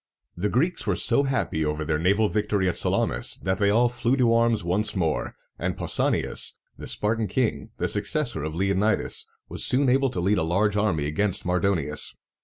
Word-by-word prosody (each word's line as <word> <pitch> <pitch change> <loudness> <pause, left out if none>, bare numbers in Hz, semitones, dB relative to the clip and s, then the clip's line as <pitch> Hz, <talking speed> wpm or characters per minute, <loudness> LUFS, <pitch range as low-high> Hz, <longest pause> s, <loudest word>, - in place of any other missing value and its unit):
The 100 +4 -1
Greeks 165 - 0
were - - +2
so 140 - +2
happy 130 -12 -1
over 75 0 -2
their 75 -1 0
naval 100 +6 +2
victory 105 -2 0
at 90 - 0
Salamis, - - +1
that 95 0 -1
they 100 -1 +3
all 115 +4 +4
flew 120 +2 0
to 120 -3 +3
arms 115 -3 +2
once 95 +6 -1
more; 80 -5 -1 0.2
and - - -2
Pau - - -4
sa´ni - - +1
as, - - -2 0.2
the - - -9
Spartan 110 +1 -1
king, 115 +4 -1
the - - -1
successor 125 - -1
of 80 +1 -4
Leonidas, 100 +3 0 0.2
was - - -1
soon 130 +1 +4
able 135 +1 +3
to 95 - -4
lead 95 +3 +2
a - - +1
large 100 +5 +1
army 100 -8 0
against 95 +6 -1
Mardonius. 90 -4 0
100 Hz, 195 wpm, -25 LUFS, 85-115 Hz, 0.2 s, all